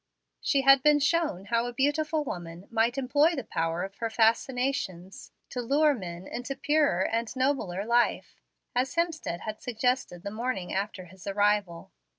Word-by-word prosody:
She 275 Hz, -, +2 dB
had 275 Hz, 0 st, +7 dB
been 295 Hz, +1 st, +5 dB
shown 300 Hz, -, +1 dB
how 230 Hz, +3 st, 0 dB
a 245 Hz, -, -5 dB
beautiful 300 Hz, +4 st, +1 dB
woman 175 Hz, -6 st, -7 dB
might 230 Hz, +2 st, +1 dB
employ 290 Hz, +5 st, +3 dB
the 265 Hz, -, -3 dB
power 165 Hz, -3 st, -2 dB
of 195 Hz, +1 st, -7 dB
her 230 Hz, -, -2 dB
fascinations 225 Hz, -4 st, 0 dB, 0.2 s
to 250 Hz, -, -3 dB
lure 290 Hz, +5 st, +3 dB
men 180 Hz, -6 st, -7 dB
into 250 Hz, +6 st, -5 dB
purer 280 Hz, -, +2 dB
and 230 Hz, 0 st, -1 dB
nobler 255 Hz, -8 st, 0 dB
life, 235 Hz, +1 st, +1 dB, 0.3 s
as 255 Hz, +5 st, 0 dB
Hemstead 325 Hz, -, -1 dB
had 215 Hz, 0 st, -6 dB
suggested 245 Hz, -6 st, -1 dB
the 200 Hz, -, -4 dB
morning 225 Hz, -4 st, -3 dB
after 195 Hz, -1 st, -3 dB
his 185 Hz, +2 st, -14 dB
arrival. 205 Hz, -3 st, 0 dB
235 Hz, 160 wpm, -28 LUFS, 195-275 Hz, 0.3 s, had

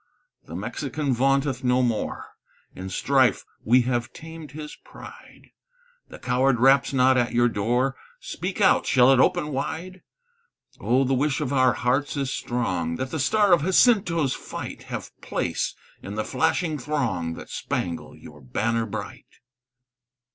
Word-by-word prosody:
"The -, -, -8 dB
Mexican 145 Hz, -4 st, -3 dB
vaunteth 135 Hz, +1 st, +1 dB
no 125 Hz, 0 st, +2 dB
more; 115 Hz, -3 st, -3 dB, 0.4 s
In 95 Hz, +1 st, -7 dB
strife 95 Hz, -, +2 dB, 0.2 s
we 125 Hz, +3 st, +4 dB
have 120 Hz, 0 st, -2 dB
tamed 160 Hz, -2 st, -10 dB
his 150 Hz, 0 st, -8 dB
pride; -, -, -14 dB, 0.6 s
The -, -, -10 dB
coward 125 Hz, 0 st, +1 dB
raps 135 Hz, +2 st, +4 dB
not 130 Hz, -1 st, +4 dB
at 120 Hz, -1 st, 0 dB
your 120 Hz, 0 st, +4 dB
door, 120 Hz, +5 st, 0 dB, 0.2 s
Speak -, -, -5 dB
out! -, -, +4 dB
shall 130 Hz, +1 st, +5 dB
it 130 Hz, -, +3 dB
open 150 Hz, +3 st, +2 dB
wide? 175 Hz, +6 st, -4 dB, 0.8 s
Oh, 130 Hz, +3 st, +2 dB
the 135 Hz, 0 st, 0 dB
wish 140 Hz, +2 st, +1 dB
of 140 Hz, -3 st, -2 dB
our 130 Hz, -3 st, +4 dB
hearts 130 Hz, +7 st, 0 dB
is 135 Hz, -1 st, -2 dB
strong, 90 Hz, -9 st, -2 dB
That 130 Hz, +8 st, -4 dB
the 160 Hz, -, -3 dB
star 205 Hz, +6 st, +3 dB
of 170 Hz, -, +4 dB
Jacinto's 180 Hz, -, +3 dB
fight -, -, -8 dB
Have -, -, -6 dB
place -, -, -2 dB, 0.3 s
in 100 Hz, +2 st, -7 dB
the 110 Hz, -, -2 dB
flashing 160 Hz, +3 st, 0 dB
throng 120 Hz, -, -2 dB
That -, -, -10 dB
spangle 85 Hz, -2 st, -4 dB
your 75 Hz, -1 st, -14 dB
banner 110 Hz, -, -1 dB
bright." 100 Hz, -, -7 dB
130 Hz, 145 wpm, -24 LUFS, 120-145 Hz, 0.8 s, shall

